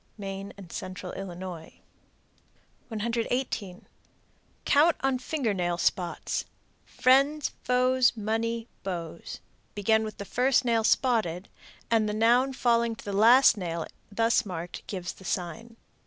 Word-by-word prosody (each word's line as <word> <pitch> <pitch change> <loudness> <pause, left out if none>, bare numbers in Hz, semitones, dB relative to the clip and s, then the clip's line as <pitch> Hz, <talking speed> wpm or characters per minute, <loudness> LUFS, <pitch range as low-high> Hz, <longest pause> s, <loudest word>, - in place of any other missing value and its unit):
Maine 195 -1 -6
and 185 -4 -11
Central 185 -1 -6
Illinois. 180 -3 -7 1.1
118. 230 -3 -2 0.8
Count 305 +3 +4
on 270 -1 +1
finger 255 -5 -1
nail 175 -2 -1
spots: 175 0 -1 0.4
Friends, 275 +4 +3
Foes, 250 0 +3
Money, 225 +2 -2
Beaux. 170 -3 -5 0.5
Begin 220 +2 +2
with 215 -1 -6
the 200 - -6
first 250 +3 +2
nail 230 -2 +2
spotted, 215 -8 +1 0.4
and 220 -2 +3
the 210 - -2
noun 240 +5 +3
falling 235 -2 +2
to - - -13
the 200 - -4
last 230 +4 +6
nail 170 -4 -3 0.3
thus 225 +2 +2
marked 175 -4 -7
gives 185 -2 -4
the - - -16
sign. 225 +7 -4
220 Hz, 125 wpm, -28 LUFS, 185-245 Hz, 1.1 s, last